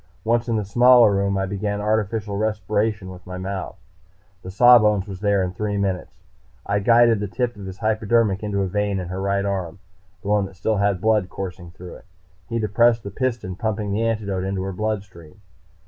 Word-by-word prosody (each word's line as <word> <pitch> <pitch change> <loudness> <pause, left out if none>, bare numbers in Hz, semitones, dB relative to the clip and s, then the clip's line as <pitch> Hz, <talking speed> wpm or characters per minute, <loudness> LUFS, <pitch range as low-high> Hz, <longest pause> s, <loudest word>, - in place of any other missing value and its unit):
Once 115 +2 +1
in 115 - +1
the 105 -2 -1
smaller 120 +2 +6
room 100 0 0
I 95 - 0
began 100 +1 -3
artificial 105 0 -1
respiration 105 -1 -1
with 90 0 -12
my 90 0 -6
mouth. 95 0 -5 0.6
The 95 - -8
sawbones 105 -2 +5
was 95 -2 -7
there 100 -2 +1
in 90 - -2
three 105 +1 -2
minutes. 95 -2 -3 0.4
I 100 0 0
guided 115 +1 +4
the 105 - -3
tip 120 +4 -2
of 100 -2 -9
his 95 0 -8
hypodermic 110 -2 +1
into 100 -2 -1
a - - -1
vein 100 +1 -1
in 90 -1 -5
her 95 +1 -4
right 100 0 0
arm, 95 -4 -3 0.5
the - - -8
one 105 -2 +2
that 95 - -15
still 105 +4 -1
had 100 -2 +1
blood 105 -3 +2
coursing 90 -2 -7
through 90 0 -11
it. - - -20 0.4
He 115 - -2
depressed 115 +1 +2
the 100 - -7
piston, 120 -6 -3
pumping 105 -1 -3
the 105 +3 -1
antidote 105 -5 -1
into 95 0 -2
her 95 0 -4
bloodstream. 100 -5 -5
100 Hz, 195 wpm, -22 LUFS, 95-110 Hz, 0.6 s, smaller